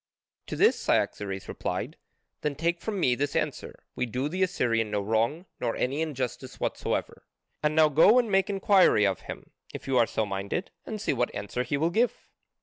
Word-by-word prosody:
To - - -4
this - - +4
Cyaxares 95 -1 -1
replied: - - -4 0.5
"Then 150 -1 -1
take 170 +3 -1
from 210 -3 -3
me 125 -8 +3
this 140 +3 -2
answer: - - -3
we 125 - -1
do 125 +4 -2
the 185 +5 -3
Assyrian 115 - +1
no 105 0 0
wrong 115 - 0
nor 115 -2 -1
any 135 +5 -1
injustice 130 -4 -4
whatsoever. - - -2 0.4
And 150 0 +1
now 160 -1 +6
go 160 - +6
and 235 -4 +2
make 195 0 +3
inquiry 195 - +4
of 95 -3 0
him, - - -9 0.2
if - - -7
you 130 -2 +3
are 115 - +4
so 110 - -1
minded, 100 - -3 0.2
and 215 - -4
see - - 0
what 125 -2 -1
answer 105 +4 -3
he 140 +3 -1
will 160 +4 +1
give." 235 +6 0
135 Hz, 190 wpm, -27 LUFS, 115-175 Hz, 0.5 s, now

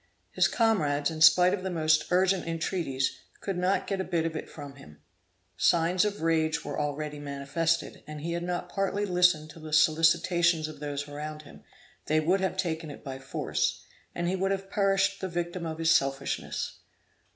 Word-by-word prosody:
His - - +3
comrades, 155 -11 +1
in 155 -1 -6
spite 180 +4 +7
of 200 - -2
the 190 - -3
most 155 -3 +2
urgent 185 0 +2
entreaties, 160 -5 -2 0.2
could 195 - -3
not 180 +2 +1
get 195 -2 -2
a - - -1
bit 170 -3 -1
of 165 -1 -3
it - - -5
from 145 -2 -10
him. 75 - -15 0.6
Signs 175 +3 +3
of 205 -5 -3
rage 160 -1 +1
were - - -4
already 150 0 -3
manifested, 145 +4 -2
and 155 0 -7
had - - -7
he 170 0 -1
not 175 0 -3
partly 195 +2 -1
listened 180 -5 +2
to - - -13
the 155 0 -9
solicitations 160 +1 +3
of 155 - -10
those 145 -1 -4
around 150 +1 -7
him, 145 - -15 0.4
they 155 +1 +3
would 180 +5 +2
have 190 0 -1
taken 160 -4 -2
it 145 - -10
by 135 -2 -6
force, 135 - -2 0.3
and 175 0 -1
he 185 - 0
would 190 +1 0
have 195 0 -3
perished 195 -1 +1
the 190 - -3
victim 175 0 -3
of 160 -1 -5
his 165 0 +2
selfishness. 135 -2 -1
165 Hz, 185 wpm, -28 LUFS, 150-180 Hz, 0.6 s, spite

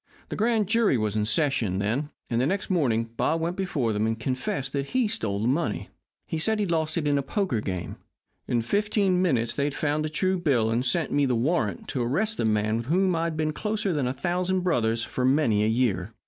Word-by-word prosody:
The - - -4
grand 220 -1 +2
jury 220 - +3
was 110 -1 -1
in 105 -1 +1
session 115 - +1
then, 115 +9 -1 0.2
and 115 0 0
the 130 - +2
next 190 +3 -2
morning 115 -10 +1
Bob 165 - +1
went 170 +2 -2
before 150 - -1
them 105 +1 0
and 110 0 -2
confessed 130 +2 -3
that 140 -1 -2
he 255 -3 +1
stole 105 - -2
the - - +1
money. 150 +7 -1 0.4
He 160 - -3
said 220 +7 +2
he 210 - 0
lost 160 -3 0
it 155 -3 0
in 145 -1 +2
a - - 0
poker 140 - -1
game. 90 -4 -4 0.5
In 120 -1 0
fifteen 200 - +1
minutes 120 -10 +1
they 140 - 0
had 145 - -2
found 150 0 0
a - - -5
true 185 +4 0
bill 125 -10 +2
and 120 +2 +1
sent 140 +4 0
me 145 -1 +2
the 125 - +1
warrant 115 - 0
to 130 - -2
arrest 195 - 0
the - - 0
man 110 0 +1
with 115 +1 -5
whom 185 +3 +2
I'd 165 -1 -1
been 155 -1 0
closer 210 0 -1
than 145 -5 0
a - - 0
thousand 180 +6 -1
brothers 115 -10 +1
for 125 - -3
many 130 -6 +3
a - - +2
year. 110 -5 +1
140 Hz, 230 wpm, -26 LUFS, 115-180 Hz, 0.5 s, jury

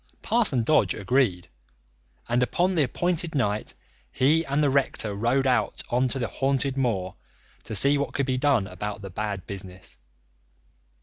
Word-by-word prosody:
Parson 210 - +1
Dodge 110 -7 +3
agreed, 100 -5 0 0.8
and 120 +1 +1
upon 175 +9 +1
the 165 - +2
appointed 170 +4 -1
night 105 -6 -1 0.4
he 150 - +3
and 140 +2 0
the 145 - +3
rector 130 -6 0
rode 120 +6 +1
out 125 -2 0
on 125 +2 +2
to 130 - -3
the 120 -3 -1
haunted 135 0 -1
moor 110 -9 -1 0.5
to 110 - -4
see 140 +7 +5
what 140 - -3
could 140 - +1
be 130 -1 -1
done 135 -7 +2
about 105 +1 -6
the 95 - -7
bad 100 -1 -4
business. 95 -2 -8
130 Hz, 160 wpm, -25 LUFS, 105-140 Hz, 0.8 s, see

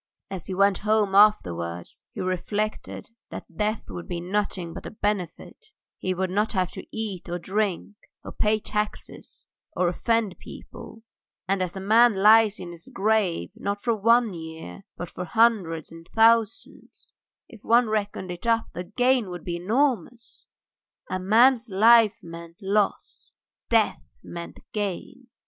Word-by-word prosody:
As 190 -3 -6
he 190 - -4
went 200 0 +3
home 210 -2 +1
afterwards, 85 - +2
he - - -6
reflected 205 +5 -3 0.2
that - - -10
death 215 +1 -1
would 175 - -8
be 175 -1 -4
nothing 180 -2 -2
but 190 - -8
a - - -5
benefit; 210 - -4 0.3
he 185 0 -2
would 185 0 -2
not 210 +4 0
have 185 -3 0
to - - -7
eat 205 -6 -5
or 175 - -2
drink, 200 +2 -2 0.3
or - - -8
pay 215 0 +1
taxes 210 0 -5 0.3
or 180 - +2
offend 215 +2 0
people, 225 - -12 0.4
and, 195 0 0
as 180 0 -3
a - - -4
man 220 +3 +5
lies 215 +1 +5
in 175 -1 -7
his 170 -1 -12
grave 195 - 0
not 200 0 -3
for 235 +2 0
one 230 0 +3
year 160 - -9
but 175 - -5
for 180 - -5
hundreds 180 -6 +1
and 165 0 -13
thousands, 225 0 +1 0.4
if 225 -5 -15
one 235 +1 +4
reckoned 205 -3 -2
it 175 +6 -7
up 230 -1 +1
the 180 - -5
gain 245 +2 +1
would 175 -1 -7
be 170 -1 -3
enormous. 235 - -1 0.6
A 185 - -1
man's 230 +5 +4
life 225 +2 +5
meant 170 0 -10
loss: 200 0 -2 0.3
death 225 -2 +2 0.2
meant 170 0 -9
gain. 210 +4 -4
205 Hz, 150 wpm, -25 LUFS, 180-220 Hz, 0.6 s, man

